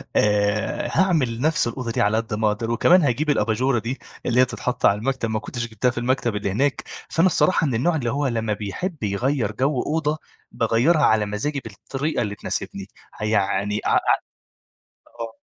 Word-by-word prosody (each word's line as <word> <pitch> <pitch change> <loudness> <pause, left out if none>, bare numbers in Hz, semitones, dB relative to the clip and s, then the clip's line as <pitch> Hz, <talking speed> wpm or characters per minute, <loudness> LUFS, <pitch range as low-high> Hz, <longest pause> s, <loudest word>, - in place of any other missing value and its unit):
آآ، 105 0 +1
هاعمل 145 -12 +2
نفس 155 -4 +2
الأوضة 120 0 -4
دي - - 0
على 105 +2 +2
قد 115 0 -3
ما 110 +1 +1
أقدَر. 115 +2 -3
وكمان 175 +10 +5
هاجيب 150 +1 0
الأباجورة 120 0 +2
دي 120 +4 -4 0.3
اللي 125 0 +2
هي - - +6
تتحطّ 125 0 -3
على 100 - +5
المكتب، 130 -1 -1
ما 110 - -1
كنتش 120 +1 -5
جِبتها 115 +3 0
في 120 - -15
المكتب 120 -2 0
اللي 100 -1 -2
هناك. 135 +7 0 0.3
فأنا 165 +3 +3
الصراحة 180 -3 +3
من 130 - -1
النوع 160 +9 +1
اللي 125 -6 -1
هو 145 0 0
لمَّا 115 -3 -1
بيحب 115 - -5
يغيِّر 110 +3 0
جو 130 +3 0
أوضة، 155 0 -1 0.3
باغيِّرها 120 +8 +2
على 110 -1 +3
مزاجي 110 +8 -2
بالطريقة 135 +8 -3
اللي 105 -2 -2
تناسبني، - - -4 0.3
هيعني 105 -1 0
ع - - +1
ع - - +6 1.2
آه. 115 -1 -5
120 Hz, 180 wpm, -23 LUFS, 110-140 Hz, 1.2 s, هي